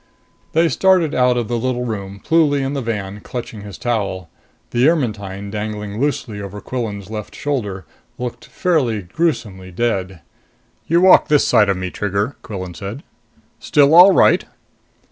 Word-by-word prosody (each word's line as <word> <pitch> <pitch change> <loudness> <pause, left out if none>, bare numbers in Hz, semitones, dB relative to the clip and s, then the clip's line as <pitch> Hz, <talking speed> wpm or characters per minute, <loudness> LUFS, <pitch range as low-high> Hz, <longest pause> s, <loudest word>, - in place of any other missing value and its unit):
They 165 +1 +4
started 175 +1 +3
out 125 -1 +3
of 120 -3 -1
the 120 +1 -1
little 125 0 -1
room, 100 -3 -5
Pluly 150 -4 +3
in 135 - -2
the 140 - -2
van, 105 -4 -4
clutching 115 -1 -7
his 100 -1 -9
towel. 100 -7 -2 0.4
The 120 +3 +3
Ermetyne, 100 - -2
dangling 105 0 -5
loosely 120 -7 -2
over 100 +1 -7
Quillan's 105 -4 -5
left 105 -2 -6
shoulder, 105 - -3 0.3
looked 125 -1 -6
fairly 130 - 0
gruesomely 95 - -2
dead. 95 -4 -2 0.7
"You 170 +2 +3
walk 185 0 +6
this 150 -1 +3
side 105 -4 +4
of 100 - +1
me, 90 -1 -4
Trigger," 105 +6 -2
Quillan 95 -4 -6
said. 100 - -7 0.6
"Still 145 +1 +3
all 180 +4 +9
right?" - - +4
110 Hz, 150 wpm, -19 LUFS, 100-140 Hz, 0.7 s, all